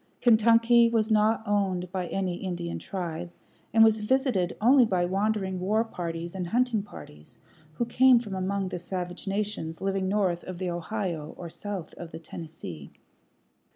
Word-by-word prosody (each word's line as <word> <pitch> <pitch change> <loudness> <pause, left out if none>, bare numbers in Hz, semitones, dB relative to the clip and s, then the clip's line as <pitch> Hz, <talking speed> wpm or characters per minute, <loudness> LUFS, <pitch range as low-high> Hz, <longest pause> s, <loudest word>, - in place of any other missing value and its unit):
Kentucky 230 +1 +5
was 225 -1 +1
not 215 +1 +3
owned 190 -3 0
by 185 -2 -2
any 185 -2 -2
Indian 175 -3 -4
tribe, 175 -2 -5 0.4
and 225 0 +6
was 220 -1 +4
visited 215 -6 +1
only 255 +4 +6
by 185 -6 +1
wandering 195 0 -1
war 210 +5 +1
parties 170 -5 -5
and 185 -2 -4
hunting 240 +1 +1
parties 75 - -13 0.4
who 240 - -1
came 255 +2 +5
from 225 -4 -3
among 190 0 -1
the 180 - -4
savage 180 +1 -5
nations 195 -5 -2
living 195 -1 -1
north 190 -4 0
of 185 -1 -6
the 180 -1 -2
Ohio 175 -3 -4
or 170 -2 -7
south 195 -4 -6
of 170 - -7
the - - -8
Tennessee. 155 - -9
195 Hz, 155 wpm, -27 LUFS, 175-220 Hz, 0.4 s, and